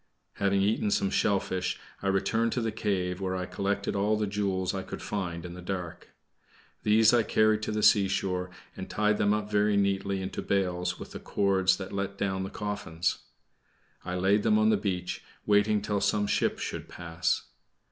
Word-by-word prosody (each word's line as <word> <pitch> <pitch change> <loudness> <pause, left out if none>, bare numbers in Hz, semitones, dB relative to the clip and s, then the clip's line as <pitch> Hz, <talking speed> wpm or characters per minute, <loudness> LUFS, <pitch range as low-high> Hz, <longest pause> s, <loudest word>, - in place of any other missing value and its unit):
Having 100 0 +2
eaten 105 +1 +1
some 100 -1 +1
shellfish, 95 -3 0 0.2
I 100 - -2
returned 105 +4 +1
to 125 - -1
the 115 -1 -1
cave, 95 -4 -1
where 95 -1 -1
I 90 0 -2
collected 100 +2 -2
all 105 +2 +2
the 105 - 0
jewels 95 -2 -1
I 95 - -2
could - - -7
find 90 -4 -3
in 85 - -7
the 90 - -9
dark. 90 -2 -5 0.7
These 110 +1 +5
I 120 - +5
carried 110 0 +2
to 110 - -2
the 105 0 -1
seashore, 95 -2 +3 0.3
and 95 - -7
tied 105 0 +1
them 105 - +3
up 105 0 -1
very 105 0 +3
neatly 100 0 +1
into 95 0 -4
bales 90 -2 -1
with - - -9
the - - -7
cords 95 -2 +2
that 95 0 -7
let 100 0 -3
down 95 -1 -1
the 95 - -3
coffins. 100 -5 -2 0.8
I 90 0 -4
laid 95 +3 +3
them 215 - +3
on 220 0 +4
the - - +4
beach, 90 - -3 0.2
waiting 105 0 +3
till 105 -1 -1
some 105 -1 +2
ship - - +1
should - - -5
pass. 85 +1 -1
100 Hz, 185 wpm, -28 LUFS, 95-105 Hz, 0.8 s, These